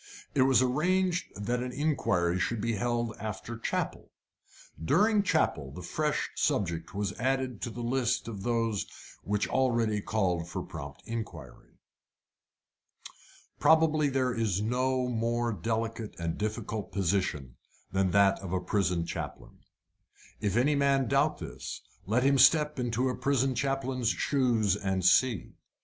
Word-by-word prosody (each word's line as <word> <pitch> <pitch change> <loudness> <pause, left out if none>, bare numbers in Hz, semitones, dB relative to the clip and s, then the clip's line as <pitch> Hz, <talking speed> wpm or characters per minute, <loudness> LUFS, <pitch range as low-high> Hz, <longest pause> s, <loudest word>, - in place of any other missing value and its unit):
It 135 - +2
was 130 -1 +5
arranged 180 +7 +1
that 120 +4 -2
an 125 0 -3
inquiry 115 - 0
should 115 +4 -1
be 115 +2 -1
held 120 +1 -1
after 110 +2 -5
chapel. - - -3 0.7
During 210 - +4
chapel 80 - 0
a 90 - -7
fresh 150 - -1
subject 90 - -1
was 100 -1 -1
added 130 -2 -1
to - - -2
the 120 +1 -6
list 125 0 0
of 105 -4 -6
those 115 -2 0 0.3
which 105 0 -1
already 115 -5 +1
called 90 -6 -1
for - - -4
prompt 70 -3 -9
inquiry. 115 -1 -7 1.8
Probably 155 -2 +4
there 130 -2 0
is 110 -5 0
no 125 +3 0
more 120 0 0
delicate 115 +3 -3
and 85 -1 -2
difficult 110 0 -4
position 90 -9 -1 0.3
than 95 0 +1
that 100 +1 +4
of 95 -2 -6
a 95 - +1
prison 90 -4 0
chaplain. - - -7 0.8
If 100 +1 0
any 140 +5 +3
man 140 -3 +2
doubt 140 +3 +2
this, - - -7 0.3
let 115 +5 +2
him 140 0 +4
step 150 +2 +5
into 120 +1 0
a 125 - -1
prison 135 -1 +1
chaplain's 130 -1 -1
shoes 120 -8 +1
and 95 -3 -2
see. 105 +2 +3
115 Hz, 135 wpm, -29 LUFS, 100-130 Hz, 1.8 s, was